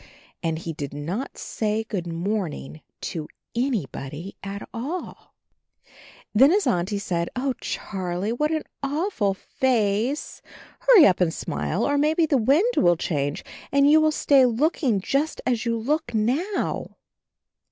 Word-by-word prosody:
And 165 -2 -1
he 165 0 -5
did 145 -2 -6
not 180 - -4
say, 215 0 -2
"Good 195 -6 -4
morning" 165 - -3 0.2
to 155 -2 -4 0.3
any 235 - 0
body 150 +9 -8
at 200 +1 -6
all. 290 +10 -6 1.0
Then 260 +6 +7
his 400 +4 +3
Auntie 185 +4 0
said, 170 -4 -2
"Oh, 260 +1 0
Charlie, 185 +1 -3
what 300 +5 0
an 315 -1 -1 0.2
awful 280 - 0
face. 235 +3 0 0.4
Hurry - - +7
up 185 -1 +3
and 170 -2 +3
smile, 75 - -2
or 285 0 +2
maybe 315 +3 +3
the 295 -3 +2
wind 305 - +3
will 175 -1 +4
change 145 -4 -2 0.3
and 280 0 +4
you 310 +1 +7
will 310 0 +4
stay 280 -3 +4
looking 250 - +2
just 280 +10 0
as 245 -2 0
you 230 0 +1
look 270 +2 -1
now!" 275 - -1
225 Hz, 140 wpm, -24 LUFS, 175-285 Hz, 1.0 s, Then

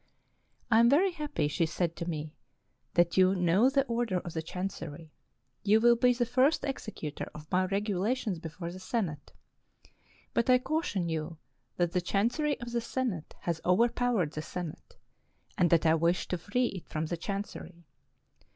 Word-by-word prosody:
" - - -38
I 225 - +6
am 235 +1 +6
very 360 +8 +4
happy," 295 - -2
she 165 +3 0
said 170 0 -1
to 170 0 -4
me, 155 -1 -4 0.3
" - - -46
that 175 0 +3
you 185 +1 +5
know 180 +7 +4
the 275 0 +2
order 235 -6 0
of 170 - -7
the 160 - -2
Chancery. 165 -3 -6 0.5
You 210 +2 +4
will 235 +1 +6
be 250 +1 +4
the 240 0 +1
first 260 +6 +2
executor 215 - -5
of 150 0 -11
my 185 +1 +3
Regulations 205 +1 -1
before 170 +1 -6
the 185 - -9
Senate. 185 - -3 1.0
But 235 - +1
I 250 - +7
caution 250 - -1
you 160 0 -3 0.4
that 175 -1 +1
the 180 - +1
Chancery 240 - 0
of 235 0 -6
the 235 0 0
Senate 230 -9 -3
has 170 -2 -2
overpowered 230 -2 +2
the 155 - -4
Senate, 170 0 -7 0.6
and 175 - +3
that 165 0 +3
I 160 - +5
wish 170 +2 +1
to 180 - 0
free 235 +8 0
it 185 - -8
from 155 0 -2
the 170 - -2
Chancery. 180 -3 -6
185 Hz, 175 wpm, -30 LUFS, 170-240 Hz, 1.0 s, I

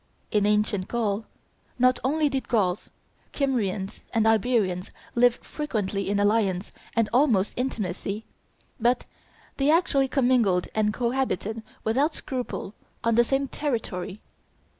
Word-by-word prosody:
In 205 -1 +3
ancient 210 -2 +1
Gaul 220 -2 -1 0.5
not 255 0 +4
only 300 +4 +2
did 270 -2 -2
Gauls, 200 -4 +1 0.4
Kymrians, 215 -8 -1 0.2
and 220 -1 +3
Iberians 215 -5 +2 0.2
live 240 0 +5
frequently 205 -10 -2
in 200 0 +1
alliance 205 -3 +1 0.2
and 230 -2 +3
almost 240 -7 +3
intimacy, 210 -4 -3 0.5
but 240 +2 +2 0.5
they 275 +1 +2
actually 300 -4 +3
commingled 245 -9 +2
and 215 -1 +2
cohabited 235 -3 -1 0.2
without 275 +8 +1
scruple 250 -6 -4 0.3
on 230 - +2
the 240 +2 +5
same 270 +3 0
territory. 215 -10 -3
225 Hz, 120 wpm, -26 LUFS, 205-255 Hz, 0.5 s, live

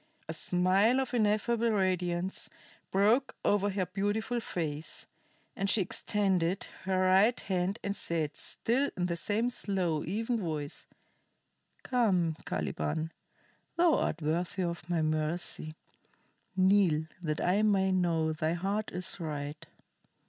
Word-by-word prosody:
A 160 - -3
smile 185 +9 +3
of 260 -1 -2
ineffable 230 +1 +2
radiance 185 -2 0 0.4
broke 220 +8 +3
over 205 0 +3
her 195 -1 -1
beautiful 205 +6 -1
face, 160 -7 -3 0.5
and 195 0 -1
she 220 - +5
extended 190 -1 0 0.2
her 190 -1 +1
right 195 +6 +4
hand 190 +1 -1
and 200 0 -2
said, 160 -5 -1
still 265 +5 -1
in 180 - +1
the 170 -1 -1
same 215 +8 0
slow, 180 -9 -1
even 225 +6 -1
voice: 155 -6 -4 1.0
"Come, 190 -10 +2
Caliban. 155 - -2 0.7
Thou 340 -2 +5
art 160 - 0
worthy 170 +4 -1
of 170 -1 -4
my 170 -2 +1
mercy. 155 0 -1 0.8
Kneel, 185 -5 +4 0.2
that 155 -3 -2
I 190 +4 +2
may 195 -3 +3
know 165 -4 +1
thy 155 0 0
heart 200 +5 -2
is 180 +2 -4
right." 150 0 -5
185 Hz, 125 wpm, -31 LUFS, 165-205 Hz, 1.0 s, she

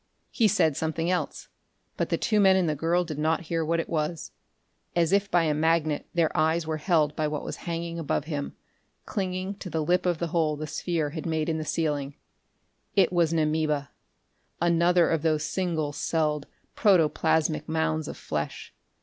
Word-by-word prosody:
He 225 - +3
said 160 -8 +2
something 160 +3 -1
else, 180 - -2 0.5
but - - -1
the - - +1
two 215 -2 +1
men 190 -2 +6
and 185 -2 +2
the 155 - +1
girl 165 +4 +1
did 155 -4 -6
not 160 +2 +1
hear 165 0 -2
what 165 +1 0
it - - -2
was. 155 0 -2 0.6
As 170 -1 +2
if 200 0 +2
by 175 -2 +3
a 155 -2 +1
magnet 155 -1 +1
their 165 -2 +2
eyes 160 +1 +2
were 155 0 -2
held 155 -2 +1
by 155 - 0
what 150 0 -3
was - - -5
hanging 170 0 -3
above 150 -2 -1
him, 145 -3 -4 0.5
clinging 185 -1 -3
to 185 - -6
the 160 -2 -1
lip 180 +3 +1
of 175 -2 +1
the 170 +1 -3
hole 155 -2 +1
the 155 +1 -5
sphere 155 0 -2
had 160 +1 -5
made 160 -1 -1
in 160 -1 -1
the - - -2
ceiling. 145 -3 -1 0.8
It 185 -2 +4
was 170 -2 +3
an 165 - +1
amoeba, 155 -2 0 0.7
another 170 +1 +3
of 165 -2 +1
those 155 -1 +1
single 160 -3 -1
celled, 150 -2 -1 0.3
protoplasmic 160 -5 +2
mounds 160 -1 0
of - - -7
flesh. 75 -1 -4
160 Hz, 185 wpm, -27 LUFS, 155-170 Hz, 0.8 s, men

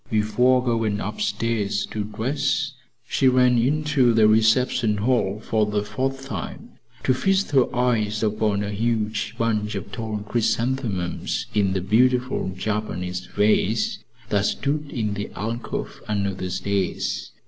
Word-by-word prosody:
Before 125 +4 +3
going 115 -4 0
upstairs 115 - -1
to 105 - -2
dress, 135 +6 -1 0.4
she 135 - +2
ran 125 -1 +4
into 140 -2 +2
the 110 -1 +6
reception 110 0 +3
hall 105 -2 +1
for 110 -1 0
the 105 -1 0
fourth 135 +6 -3
time 100 - -6 0.3
to 130 - +3
feast 195 +8 +1
her 135 -3 +5
eyes 115 -4 +1
upon 105 -1 +1
a 100 - -3
huge 110 0 -1
bunch 105 -2 0
of 100 +1 -6
tall 110 -2 -4
chrysanthemums 115 -5 -1
in 100 -3 +2
the 95 - 0
beautiful 125 +3 +2
Japanese 90 -3 -3
vase 105 +1 +1 0.3
that 100 -1 +2
stood 145 +1 -2
in 110 -6 -2
the 100 0 -4
alcove 115 +3 -4
under 100 -2 0
the 95 0 -4
stairs. 95 0 -2
110 Hz, 135 wpm, -23 LUFS, 105-125 Hz, 0.4 s, the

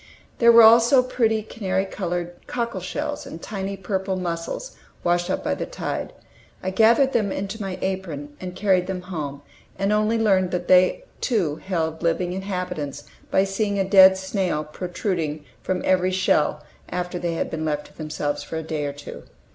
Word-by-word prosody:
There 235 -1 +7
were 230 0 +9
also 235 +3 +7
pretty 225 -4 +1
canary 190 -3 -2
colored 175 -3 -3 0.2
cockle 235 -5 -2
shells 290 - -4
and 160 - -8
tiny 195 0 -4
purple 190 0 -2
mussels 180 - -4 0.3
washed 175 0 +1
up - - -1
by - - 0
the - - -4
tide. - - -4 0.5
I 190 - -1
gathered 230 +7 +4
them 210 -4 +1
into 200 +3 -4
my 190 -2 -4
apron, 165 -7 -4
and 180 -1 -6
carried 185 -2 +2
them 185 -1 -4
home, 145 -6 -5 0.3
and 195 +1 +1
only 215 +2 +2
learned 195 -5 +3
that 175 -1 -3
they 185 - +5 0.2
too 180 - 0
held 160 -4 -2
living 175 +1 0
inhabitants 180 -7 -4 0.3
by 190 - +3
seeing 200 +1 -1
a 195 -1 +1
dead 190 -1 +8
snail 190 -5 -1
protruding 160 -1 -3 0.2
from 185 -1 -2
every 185 0 +3
shell 150 -5 +1 0.3
after 180 0 -3
they 170 -1 -2
had - - -2
been 160 -1 -3
left 150 -1 -1
to - - -17
themselves 150 -2 -3
for 160 - -6
a 160 - -3
day 155 -2 -3
or 140 - -3
two. 145 0 -10
185 Hz, 175 wpm, -23 LUFS, 170-200 Hz, 0.5 s, were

